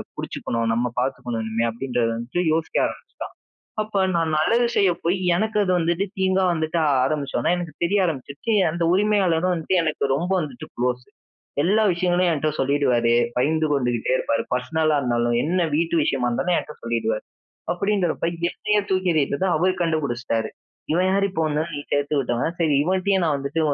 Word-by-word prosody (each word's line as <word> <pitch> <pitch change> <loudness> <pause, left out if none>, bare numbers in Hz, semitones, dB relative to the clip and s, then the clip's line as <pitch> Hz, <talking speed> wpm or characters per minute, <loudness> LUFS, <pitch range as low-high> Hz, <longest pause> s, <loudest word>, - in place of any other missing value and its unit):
பிடிச்சுக்கணும். 115 0 -3
நம்ம 120 +2 0
பார்த்துக்கணும் 125 -3 -2
இனிமே," 110 +1 -1
அப்படின்றதை 120 0 -1
வந்து 120 +9 -4
யோசிக்க 160 0 -1
ஆரம்பிச்சுட்டான். - - -9 0.5
அப்போ 215 -1 -3 0.2
நான் 165 -2 +1
நல்லது 230 +10 +3
செய்ய 195 -2 +4
போய் 175 +3 +2 0.2
எனக்கு 215 +4 0
அது 185 - +1
வந்துவிட்டு 170 +3 0
தீங்கா 190 0 +2
வந்துட்டு 160 +1 -1 0.3
ஆரம்பிச்சோனே 140 +1 -1
எனக்கு 175 -3 -5
தெரிய 200 +4 +2
ஆரம்பிச்சுருச்சு, 145 - -4 0.2
அந்த 170 +2 -3
உரிமையாளரும் 185 -3 +2
வந்துட்டு 175 +2 0
எனக்கு 155 -3 -1
ரொம்ப 170 +6 -2
வந்துட்டு 140 -7 -6
குளோஸ். 125 0 -1 0.6
எல்லா 205 +7 +3
விஷயங்களையும் 175 0 +1
என்கிட்ட 155 0 0
சொல்லிடுவாரு, 130 -4 +2 0.2
பகிர்ந்து 155 +5 +2
கொண்டுகிட்டே 120 -4 0
இருப்பார் 115 -2 0
பர்ஸ்னலா 155 +4 +1
இருந்தாலும் 120 -2 0
என்ன 175 +4 +1
வீட்டு 165 +1 0
விஷயமா 125 -4 0
இருந்தாலும் 135 +9 0
என்கிட்ட 150 - -4
சொல்லிடுவாரு, 115 -2 -1 0.5
அப்படிங்கிறப்ப, 190 -2 0 0.2
என்னையே 210 -1 0
தூக்கி 185 -1 +1
எறிட்டத 145 +2 0
அவர் 185 +3 +1
கண்டுபிடிச்சிட்டாரு. 125 -8 -1 0.4
இவன் 180 +3 +2
யாரு 195 +1 +2
இப்போ 165 -3 -2
வந்தாலும் 155 +2 -2
நீ - - -3
சேர்த்து 145 +1 0
விட்டவன் 130 +6 -1
சரி, 155 -3 +2
இவன்ட்டயும் 190 +1 +1
நான் 155 -3 +1
வந்துட்டு 140 +4 -2
155 Hz, 155 wpm, -23 LUFS, 125-180 Hz, 0.6 s, செய்ய